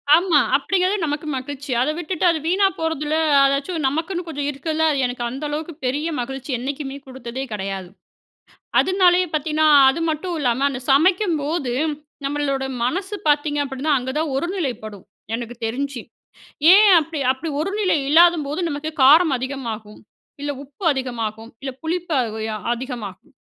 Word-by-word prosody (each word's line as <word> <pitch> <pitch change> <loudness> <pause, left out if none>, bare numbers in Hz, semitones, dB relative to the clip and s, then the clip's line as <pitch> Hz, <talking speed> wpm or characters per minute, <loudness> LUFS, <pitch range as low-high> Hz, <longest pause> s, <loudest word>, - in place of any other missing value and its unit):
ஆமா, 340 -3 +4 0.2
அப்படிங்கிறது 370 +7 +1
நமக்கு 300 +1 -3
மகிழ்ச்சி. 280 +1 -6
அத 260 - +1
விட்டுட்டு 350 +1 -2
அது 330 -2 +1
வீணா 385 +4 +3
போறதில 315 -2 -1 0.3
அதாச்சும் 280 +3 0
நமக்குன்னு 335 +5 -2
கொஞ்சம் 290 -3 -3
இருக்கதுல 310 +3 -2
அது 280 - -1
எனக்கு 245 -1 -3
அந்த 270 +5 -7
அளவுக்கு 310 +3 -4
பெரிய 285 +5 -1
மகிழ்ச்சி 270 +3 -5
என்னைக்குமே 270 +2 -5
குடுத்ததே 260 0 -6
கெடையாது, 195 -3 -4 0.9
அதுனாலேயே 365 -1 +3
பாத்தீங்கன்னா 310 +1 +2 0.2
அது 270 +5 0
மட்டும் 340 +3 -3
இல்லாம 255 0 +1
அந்த 260 -2 -5
சமைக்கும்போது, 315 - +2 0.5
நம்மளோட 275 -1 -1 0.2
மனசு 380 - -2
பாத்தீங்க 295 0 +2
அப்படின்னா, 275 +2 -2
அங்க 250 +1 -5
தான் 315 -3 -1
ஒரு 310 - -1
நிலைப்படும். 215 - -5 0.3
எனக்கு 240 0 -5
தெரிஞ்சு. 265 +3 -3 0.7
ஏன் 420 +1 +7
அப்டி 315 0 -5
அப்டி 265 +5 -5
ஒரு 390 - -2
நிலை 385 -5 +2
இல்லாதம்போது 320 -2 +4
நமக்கு, 290 +1 -4
காரம் 305 +3 +7
அதிகமாகும், 235 -5 -6 0.4
இல்ல 290 0 -2
உப்பு 285 +7 -15
அதிகமாகும், 230 -4 -4
இல்ல 270 - -4
புளிப்பு 335 -2 -1 0.2
உ - - -5
ய 220 - -3 0.2
அதிகமாகும். 235 -7 -7
285 Hz, 145 wpm, -21 LUFS, 260-325 Hz, 0.9 s, ஏன்